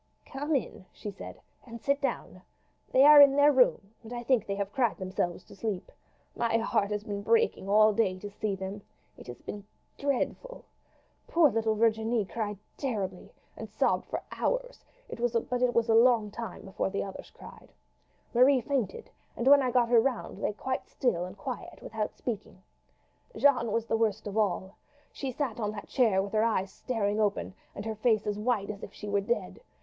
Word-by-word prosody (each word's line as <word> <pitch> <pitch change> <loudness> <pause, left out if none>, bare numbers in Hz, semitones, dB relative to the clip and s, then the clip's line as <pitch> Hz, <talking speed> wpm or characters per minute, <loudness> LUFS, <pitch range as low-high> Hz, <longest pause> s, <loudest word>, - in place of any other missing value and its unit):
"Come 290 +3 -2
in," 195 -7 -3
she 210 - -7
said, 195 - -10 0.2
"and 235 -2 -10
sit 280 +4 0
down. 275 - -3 0.5
They 260 - +6
are 295 0 +10
in 280 -1 +7
their 285 +1 +6
room, 245 -6 +2
and 230 0 -12
I 240 0 -5
think 240 -3 +2
they 200 - -2
have 200 0 -4
cried 240 -6 +1
themselves 185 -2 -3
to - - -15
sleep. 200 -2 -4 0.4
My 230 -1 +1
heart 215 -3 0
has 210 -1 -2
been 205 -1 -4
breaking 450 - +1
all 215 +1 +5
day 200 -4 +1
to 205 +2 -8
see 205 -1 -2
them. 190 +2 -6 0.3
It - - -14
has 120 - -10
been 205 -1 -7 0.4
dreadful. 285 - -2 0.6
Poor 330 -5 +4
little 220 0 +1
Virginie 220 0 +1
cried 210 0 -4 0.2
terribly, 200 -9 -4 0.2
and - - -8
sobbed - - 0
for - - -4
hours; - - -2 0.2
but - - -8 0.4
it 250 -1 +2
was 235 0 +3
a 225 - +3
long 230 -2 +4
time 230 +1 -7
before 195 0 -2
the 200 - -2
others 195 - -8
cried. - - -14 0.6
Marie 255 +3 +5
fainted, 250 -7 -3 0.3
and 235 - -2
when 280 +1 +7
I 255 - +1
got 245 -1 +2
her 235 -2 +6
round 250 -1 -3
lay 210 - -2 0.3
still 180 -10 -1
and 185 +2 -10
quiet 250 +4 -6
without 220 -1 -4
speaking. 205 -5 -6 0.7
Jeanne 250 -6 +3
was 230 +1 -1
worst 220 -2 0
of 205 -1 -5
all. 195 -2 -1 0.4
She 275 - -4
sat 250 -3 -3
on 210 -2 -1
that 205 - -8
chair 215 -7 +3
with 200 - -7
her 215 0 +3
eyes 195 -4 0
staring 210 -3 -2
open 195 - 0 0.2
and 200 - -6
her 220 - -2
face 215 -1 +1
as 210 0 -2
white 210 -3 0
as 200 -1 -10
if - - -8
she 210 - -9
were 200 0 +1
dead. 235 +4 -3
220 Hz, 185 wpm, -29 LUFS, 200-250 Hz, 0.7 s, are